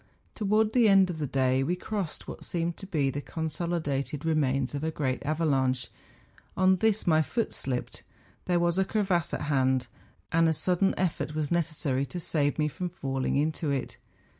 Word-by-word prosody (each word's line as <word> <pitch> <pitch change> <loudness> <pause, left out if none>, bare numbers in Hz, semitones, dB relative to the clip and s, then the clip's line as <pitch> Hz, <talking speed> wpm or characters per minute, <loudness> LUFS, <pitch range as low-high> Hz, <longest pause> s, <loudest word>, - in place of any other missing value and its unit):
Towards 215 +1 +1
the 235 -4 +5
end 195 -2 +5
of 160 - -7
the 150 - -1
day 130 -1 +2
we 170 +7 0
crossed 190 -3 -4
what - - -8
seemed 170 -1 -2
to 195 - -9
be 145 -7 +1
the 145 - -4
consolidated 155 -3 -2
re¬ 160 0 +1
mains 135 -3 +1
of 145 +1 -3
a 160 - 0
great 135 -5 -2
avalanche; 135 -4 0 0.7
on 185 0 +4
this 220 +2 +2
my 160 -2 +4
foot 230 +8 -2
slipped; 125 -2 -3 0.4
there 175 -1 +2
was 175 +1 +2
a - - +4
crevasse 190 -5 0
at - - -3
hand, 130 -3 +1 0.5
and 165 0 +4
a - - +2
sudden 180 +4 +1
effott 170 -4 -1
was 155 -2 -1
necessary 150 -5 0
to 180 - -5
save 145 -3 0
me 150 -1 +2
from 180 +4 -4
falling 135 -6 -2
into 155 +2 0
it. 135 -3 -2
160 Hz, 185 wpm, -28 LUFS, 140-180 Hz, 0.7 s, the